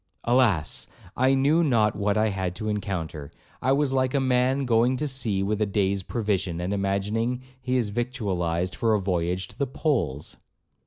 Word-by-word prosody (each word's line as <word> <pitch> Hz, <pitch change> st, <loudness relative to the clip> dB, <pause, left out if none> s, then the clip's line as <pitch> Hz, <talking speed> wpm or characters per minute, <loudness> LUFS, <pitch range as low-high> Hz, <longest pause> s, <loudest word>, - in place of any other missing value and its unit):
Alas! 115 Hz, -, +2 dB, 0.3 s
I 130 Hz, +2 st, +3 dB
knew 145 Hz, +5 st, +3 dB
not 115 Hz, -8 st, +2 dB
what 100 Hz, +1 st, 0 dB
I 110 Hz, 0 st, +3 dB
had 95 Hz, -3 st, -3 dB
to 110 Hz, +3 st, -5 dB
encounter. 90 Hz, -8 st, -3 dB, 0.3 s
I 130 Hz, -, +2 dB
was 140 Hz, -1 st, +1 dB
like 130 Hz, 0 st, +1 dB
a -, -, +4 dB
man 130 Hz, +1 st, +2 dB
going 120 Hz, +2 st, +3 dB
to 150 Hz, -, -1 dB
sea 115 Hz, -8 st, +1 dB
with 105 Hz, +2 st, -1 dB
a 105 Hz, -, +2 dB
day's 100 Hz, -1 st, 0 dB
provision, 95 Hz, -5 st, -2 dB
and 90 Hz, +3 st, -2 dB
imagining 105 Hz, +5 st, -1 dB, 0.2 s
he 130 Hz, 0 st, 0 dB
is 115 Hz, -4 st, 0 dB
victualled 95 Hz, -7 st, -2 dB
for 115 Hz, -2 st, +2 dB
a -, -, +1 dB
voyage 90 Hz, -1 st, -1 dB
to -, -, -16 dB
the 140 Hz, -, +1 dB
poles. 125 Hz, -, -2 dB
110 Hz, 175 wpm, -25 LUFS, 95-130 Hz, 0.3 s, a